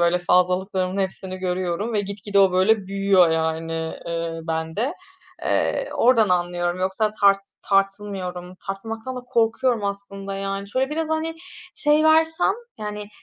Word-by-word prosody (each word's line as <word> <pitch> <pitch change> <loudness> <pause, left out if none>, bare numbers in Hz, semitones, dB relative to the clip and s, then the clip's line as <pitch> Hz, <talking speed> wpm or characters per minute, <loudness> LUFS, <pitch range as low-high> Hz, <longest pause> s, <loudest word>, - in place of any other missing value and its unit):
böyle 170 +1 +3
fazlalıklarımın 185 +1 +1
hepsini 190 -1 -4
görüyorum 185 +3 -2
ve 210 - +2
gitgide 200 0 -2
o, 195 -2 +5
böyle, 190 +2 +3
büyüyor, 195 -3 +4
yani, 160 0 -1 0.3
eee, 165 -1 -3
bende. 160 - -2 0.5
Eee, - - 0
oradan 230 -3 +4
anlıyorum, 175 0 0
yoksa 190 +3 +1
tart 200 -1 +6 0.2
tartılmıyorum. 195 -2 -1
Tartılmaktan 225 +6 -5
da - - -4
korkuyorum 235 -1 +1
aslında, 200 0 -5
yani. 195 0 -3
Şöyle, 265 +2 +1
biraz, 315 +1 -2
hani, 315 +1 -1 0.4
şey 300 +1 +3
versem, 320 +3 +4 0.3
yani, 210 -1 -5
195 Hz, 130 wpm, -23 LUFS, 180-225 Hz, 0.5 s, tart